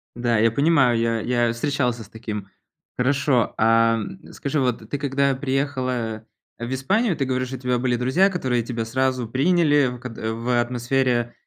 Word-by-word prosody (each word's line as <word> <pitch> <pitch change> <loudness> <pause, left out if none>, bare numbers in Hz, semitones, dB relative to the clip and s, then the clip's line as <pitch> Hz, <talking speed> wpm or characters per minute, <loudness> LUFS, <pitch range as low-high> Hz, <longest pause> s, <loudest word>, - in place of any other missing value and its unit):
Да, 120 -1 +1
я 115 +1 +4
понимаю, 140 -2 +3
я 115 0 0
я 120 -1 +1
встречался 125 -2 -1
с 100 - -17
таким. 110 -2 -6 0.5
Хорошо, 130 -2 +1
а 115 0 +4 0.3
скажи, 145 +2 -2
вот 120 -4 -1
ты 145 - -2
когда 140 -1 +1
приехала 130 -5 -2 0.3
в 120 +2 -4
Испанию, 190 - +1
ты 140 - -1
говоришь, 130 0 -1
что 130 - -5
у - - -15
тебя 125 -1 0
были 125 0 0
друзья, 130 +11 +3
которые 130 -10 -1
тебя 115 -1 -3
сразу 130 0 -1
приняли 145 -2 +2
ког 125 -2 -8
в 115 +2 -1
атмосфере 120 0 0
125 Hz, 160 wpm, -23 LUFS, 115-135 Hz, 0.5 s, я